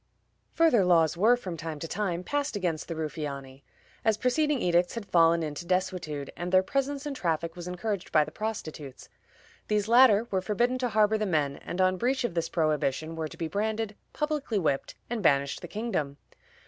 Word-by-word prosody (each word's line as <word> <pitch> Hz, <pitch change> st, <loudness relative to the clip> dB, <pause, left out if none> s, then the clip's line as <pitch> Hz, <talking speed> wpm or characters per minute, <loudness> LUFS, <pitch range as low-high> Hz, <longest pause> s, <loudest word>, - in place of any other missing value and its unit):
Further 320 Hz, -11 st, +4 dB
laws 165 Hz, -3 st, +4 dB
were, 220 Hz, +7 st, +4 dB
from 185 Hz, -8 st, -6 dB
time 160 Hz, -1 st, -5 dB
to 165 Hz, -, -5 dB
time, 180 Hz, -2 st, -2 dB
passed 285 Hz, +3 st, -2 dB
against 175 Hz, -6 st, -2 dB
the 165 Hz, -, -4 dB
Ruffiani, 140 Hz, -4 st, -5 dB, 0.4 s
as 220 Hz, -3 st, +2 dB
preceding 290 Hz, +4 st, +1 dB
edicts 175 Hz, 0 st, +2 dB
had 230 Hz, -3 st, -5 dB
fallen 165 Hz, -2 st, +4 dB
into 150 Hz, +2 st, -4 dB
desuetude, 180 Hz, -6 st, -2 dB
and 175 Hz, +1 st, -4 dB
their 185 Hz, 0 st, +5 dB
presence 275 Hz, +6 st, -2 dB
and 290 Hz, -2 st, -3 dB
traffic 165 Hz, -5 st, -1 dB
was 175 Hz, 0 st, -7 dB
encouraged 190 Hz, +2 st, -3 dB
by 155 Hz, -, +5 dB
the -, -, -9 dB
prostitutes. 155 Hz, -11 st, -6 dB, 0.6 s
These 210 Hz, -1 st, +1 dB
latter 235 Hz, -2 st, +6 dB
were 190 Hz, -1 st, +1 dB
forbidden 240 Hz, +6 st, 0 dB
to 250 Hz, -1 st, 0 dB
harbor 215 Hz, 0 st, +3 dB
the 215 Hz, -, 0 dB
men, 145 Hz, -5 st, 0 dB
and 175 Hz, -, -7 dB
on 185 Hz, 0 st, +3 dB
breach 255 Hz, +5 st, 0 dB
of 240 Hz, -, -1 dB
this 170 Hz, -1 st, -1 dB
prohibition 155 Hz, -1 st, 0 dB
were 160 Hz, -1 st, -3 dB
to -, -, -12 dB
be 165 Hz, -, -2 dB
branded, 215 Hz, +4 st, -2 dB, 0.2 s
publicly 300 Hz, -7 st, -2 dB
whipped, 150 Hz, -7 st, -1 dB
and 235 Hz, -2 st, -3 dB
banished 140 Hz, -5 st, +2 dB
the 175 Hz, -, -7 dB
kingdom. 170 Hz, -9 st, -3 dB
185 Hz, 185 wpm, -28 LUFS, 160-225 Hz, 0.6 s, latter